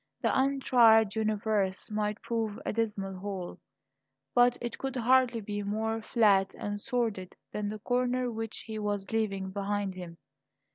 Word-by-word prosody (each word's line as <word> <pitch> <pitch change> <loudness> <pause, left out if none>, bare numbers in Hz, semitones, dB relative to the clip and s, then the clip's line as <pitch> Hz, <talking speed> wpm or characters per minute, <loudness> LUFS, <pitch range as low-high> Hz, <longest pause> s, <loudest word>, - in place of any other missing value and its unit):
The - - +1
untried 240 -6 +5
universe 215 -3 0
might 210 0 -2
prove 225 -3 -2
a - - -1
dismal 210 -3 -2
hole, 185 -3 -5 0.7
but 245 0 +5
it 240 -1 -5
could 270 -1 -3
hardly 250 -1 +3
be 205 0 -4
more 220 +2 -2
flat 205 -4 +3
and 205 0 -4
sordid 225 -8 -2 0.2
than 210 -1 -2
the 215 - -4
corner 250 +2 0
which 225 -1 -5
he 220 -1 -6
was 205 -2 -2
leaving 195 -4 -1
behind 200 0 -2
him. 175 -2 -9
215 Hz, 145 wpm, -30 LUFS, 200-235 Hz, 0.7 s, untried